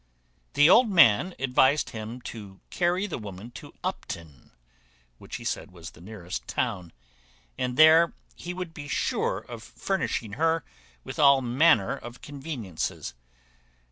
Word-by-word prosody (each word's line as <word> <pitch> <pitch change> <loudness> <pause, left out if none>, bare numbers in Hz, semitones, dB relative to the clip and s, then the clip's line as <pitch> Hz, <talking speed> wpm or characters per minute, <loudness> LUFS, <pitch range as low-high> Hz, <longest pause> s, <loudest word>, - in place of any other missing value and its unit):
The 145 +1 +6
old 235 +6 +6
man 170 - +5
advised 135 +2 +2
him 115 +2 -7
to 100 -5 -9
carry 180 +2 +1
the 185 - -5
woman 105 +2 -9
to - - -11
Upton, 75 -7 -6 0.7
which, - - -9
he - - -7
said, - - -3
was 85 -3 -11
the - - -17
nearest 90 -2 -7
town, 100 -9 -3 0.6
and 125 0 -3
there 160 +2 +6 0.2
he 175 - -7
would 180 -2 -6
be 145 -3 -8
sure - - -1
of - - -9
furnishing 110 -3 -3
her 165 0 +2 0.4
with - - -8
all 140 -2 +6
manner 125 -4 +3
of 120 +1 -10
conveniencies. 135 - -5
125 Hz, 140 wpm, -26 LUFS, 105-160 Hz, 0.7 s, The